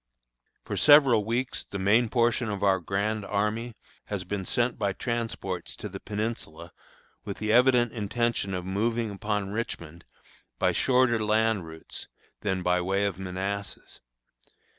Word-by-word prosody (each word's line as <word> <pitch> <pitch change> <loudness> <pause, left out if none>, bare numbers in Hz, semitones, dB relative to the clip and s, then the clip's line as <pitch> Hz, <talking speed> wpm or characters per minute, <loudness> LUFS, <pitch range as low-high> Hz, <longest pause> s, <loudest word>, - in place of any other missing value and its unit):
For - - -3
several 140 -7 +7
weeks 120 +3 -1
the 100 - -6
main 110 +5 +3
portion 120 -1 +2
of 100 -1 -3
our 95 -1 +4
grand 100 +4 -1
army 105 +4 -1 0.3
has 100 -3 -3
been 95 0 -4
sent 120 +4 0
by 100 -2 0
transports 115 -6 -3
to 105 - -6
the 95 -1 -8
Peninsula, 105 -7 -5 0.5
with 100 - -5
the 110 0 0
evident 125 -1 +5
intention 115 -2 -1
of 90 -1 -4
moving 110 +4 0
upon 105 -1 -2
Richmond 85 -7 -5 0.5
by 90 - +2
shorter 120 +4 +3
land 110 -4 +2
routes 80 0 -8 0.3
than 95 -3 -1
by 90 0 +2
way 95 +3 +1
of 95 -2 -2
Manassas. 95 +2 -5
105 Hz, 140 wpm, -27 LUFS, 95-115 Hz, 0.5 s, several